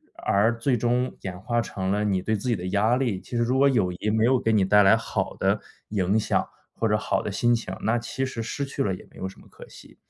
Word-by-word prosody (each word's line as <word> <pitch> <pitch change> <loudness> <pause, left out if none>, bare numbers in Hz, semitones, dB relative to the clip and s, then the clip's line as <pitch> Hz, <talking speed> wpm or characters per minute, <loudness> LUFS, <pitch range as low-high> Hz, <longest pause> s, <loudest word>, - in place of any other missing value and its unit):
而 110 +3 +1
最 125 +2 +1
终 125 +2 0
演 90 -2 -5
化 120 +4 -1
成 95 -3 -3
了 105 +1 0
你 95 -3 +1
对 110 - -1
自 115 - -6
己 120 - +2
的 90 -2 -5
压 105 +5 +2
力。 120 -7 -1
其 - - -19
实 120 - +2
如 125 +3 +1
果 140 +1 +5
友 110 -10 +2
谊 90 +4 -3
没 110 +1 +2
有 130 +2 +4
给 115 - +1
你 105 -3 +4
带 105 +2 +5
来 95 +3 +6
好 115 - -3
的 - - +1 0.3
影 100 0 +1
响 110 - 0 0.3
或 - - -1
者 - - +2
好 - - -1
的 - - -4
心 120 0 +2
情， 110 -5 -2
那 115 +3 +1
其 130 +3 -3
实 130 -3 -4
失 120 +5 -3
去 140 0 -4
了 95 -7 0
也 - - -13
没 - - -17
有 95 - -4
什 95 - -11
么 - - -18
可 - - -13
惜。 - - -15
110 Hz, 290 characters per minute, -25 LUFS, 100-120 Hz, 0.3 s, 来